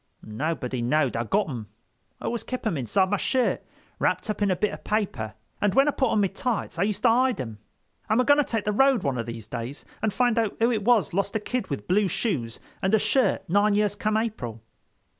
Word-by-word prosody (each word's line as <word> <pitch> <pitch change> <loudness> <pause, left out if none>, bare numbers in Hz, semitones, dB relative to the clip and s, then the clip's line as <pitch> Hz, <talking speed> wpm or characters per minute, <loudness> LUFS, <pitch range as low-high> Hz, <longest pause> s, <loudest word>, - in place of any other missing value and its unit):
"Nobody 125 +2 -3
know'd 140 +2 +1
I'd 115 -1 -2
got 205 -1 +2
'em; 120 -8 -6 0.5
I - - -8
always 235 -1 -2
kep' 255 -1 -5
'em 215 - +1
inside 185 - +1
my 205 - +2
shirt, 255 +5 +1 0.4
wrapt 215 - 0
up 210 - -6
in 205 - +3
a 185 - +2
bit 210 +4 0
of - - -9
paper, 195 - -2 0.3
and 205 -2 +2
when 275 +2 +5
I - - +4
put 265 -3 +1
on 215 - +2
me 200 - +3
tights 200 -2 -3
I - - +3
used 210 - -4
to - - +6
hide 250 - +3
'em. 115 -5 -5 0.5
I'm 215 +3 +3
a - - +5
going 285 +2 +5
to - - +5
take 225 -5 -2
the 210 - +1
road 265 0 +3
one 135 -4 -1
of 115 - -3
these 115 -2 -6
days, 120 +4 -6 0.2
and 220 - +1
find 245 +1 +2
out 220 -3 -1
who 230 +2 +3
it 220 -3 0
was 225 -4 +3
lost 200 +3 -1
a - - +2
kid 235 0 -3
with 135 -8 -4
blue 200 +2 +3
shoes 150 - -2 0.2
and 195 +3 +3
shirt 245 -5 +1
nine 205 +3 +3
years 210 -1 +2
come 215 +1 0
April." 125 - -3
205 Hz, 235 wpm, -26 LUFS, 140-225 Hz, 0.5 s, to